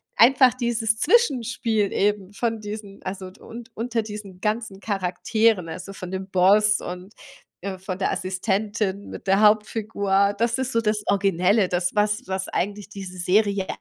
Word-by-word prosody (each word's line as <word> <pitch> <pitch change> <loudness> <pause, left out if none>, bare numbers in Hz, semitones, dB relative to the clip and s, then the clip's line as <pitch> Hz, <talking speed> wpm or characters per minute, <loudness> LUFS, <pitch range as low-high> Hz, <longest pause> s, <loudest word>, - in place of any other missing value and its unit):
einfach 255 +1 +6
dieses 230 -3 0
Zwischenspiel 245 - +2
eben 205 -1 0
von 225 +1 -2
diesen, 210 -1 -8
also 185 -1 -5
und 235 0 -10
unter 230 0 -1
diesen 205 -3 -9
ganzen 215 -2 -2
Charakteren, 195 0 0
also, 190 +4 -7
von 185 -2 -8
dem 190 0 -5
Boss 205 +3 +4
und, 180 +3 -8 0.5
äh, 190 0 -4
von 185 0 -6
der - - 0
Assistentin 195 +2 -2
mit - - -9
der 195 +2 +4
Hauptfigur, 210 -2 +2
das 235 +1 +1
ist 260 0 -2
so 230 - +1
das 210 -1 0
Originelle, 195 0 +2
das 180 0 0
was 210 +3 +1
was 190 0 -2
eigentlich 205 +2 -3
diese 190 -3 -8
Serie 200 +1 +2
205 Hz, 150 wpm, -24 LUFS, 190-220 Hz, 0.5 s, einfach